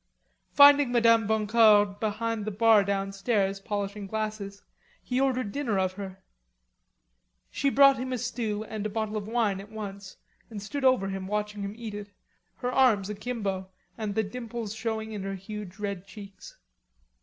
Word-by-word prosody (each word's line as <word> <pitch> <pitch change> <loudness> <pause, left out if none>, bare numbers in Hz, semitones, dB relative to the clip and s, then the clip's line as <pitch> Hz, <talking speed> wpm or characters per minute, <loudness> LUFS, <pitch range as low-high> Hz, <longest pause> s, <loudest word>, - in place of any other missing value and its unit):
Finding 285 -2 +7
Madame 230 -2 +4
Boncour 215 -1 +5
behind 220 0 -2
the - - -1
bar 215 0 +5
downstairs, 195 0 -1
polishing 205 0 -4
glasses, 215 -1 -4 0.4
he 250 +1 -1
ordered 255 -5 0
dinner 240 -5 -1
of 185 -1 0
her. 190 -1 -8 1.3
She 280 - +1
brought 275 -1 +6
him 255 +1 -4
a 255 - -1
stew 220 -2 -3
and 215 -1 -6
a 215 - -2
bottle 220 0 -3
of 210 -1 -4
wine 215 -4 0
at 200 - -13
once, 200 -3 -8 0.3
and 215 -3 -7
stood 270 +8 -5
over 255 -7 +3
him 190 -1 -5
watching 210 0 -3
him 200 +1 -5
eat 225 -3 -6
it, 205 0 -7 0.5
her 250 - -3
arms 220 -7 +3
akimbo 200 -4 -4 0.3
and 215 -3 -4
the 220 - +2
dimples 230 0 -6
showing 220 -1 -3
in 210 -2 -5
her 195 0 -4
huge 195 -1 -8
red 200 -2 -4
cheeks. 200 -3 -12
210 Hz, 160 wpm, -27 LUFS, 200-230 Hz, 1.3 s, Finding